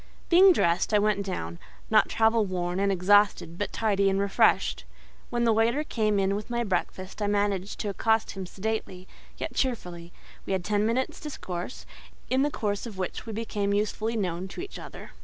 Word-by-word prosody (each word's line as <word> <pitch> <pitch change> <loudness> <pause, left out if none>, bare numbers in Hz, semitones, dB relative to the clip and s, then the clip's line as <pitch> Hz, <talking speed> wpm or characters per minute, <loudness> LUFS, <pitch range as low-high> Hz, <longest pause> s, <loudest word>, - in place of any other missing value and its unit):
Being 370 +2 +8
dressed, 175 - +2
I - - +7
went 205 -1 +1
down; 85 - -5 0.3
not - - +5
travel 225 0 +3
worn 180 -2 -2
and 200 0 +2
exhausted, 190 -2 +3
but 205 - -2
tidy 200 -3 +2
and 195 0 +1
refreshed. 200 0 +2 0.5
When 240 0 0
the 230 -1 +4
waiter 230 +7 +2
came 215 -7 0
in 195 0 +1
with 210 +3 -5
my 240 0 0
breakfast, 190 -1 -3
I 205 - +1
managed 205 -1 0
to 210 - -2
accost 220 +2 +1
him 190 -2 -6
sedately, 190 -2 -4 0.3
yet - - -4
cheerfully; 180 -10 -3 0.3
we - - -3
had 190 -2 -1
ten 210 0 +1
minutes' 255 +3 -1
discourse, 185 - -6 0.5
in 260 +1 +3
the 290 - +2
course 205 -4 -2
of 210 -4 -9
which 185 +4 -4
we 220 - -4
became 205 -2 -1
usefully 215 +2 -1
known 185 -2 -2
to 195 - -7
each 390 - -8
other. - - -10
205 Hz, 185 wpm, -27 LUFS, 190-225 Hz, 0.5 s, Being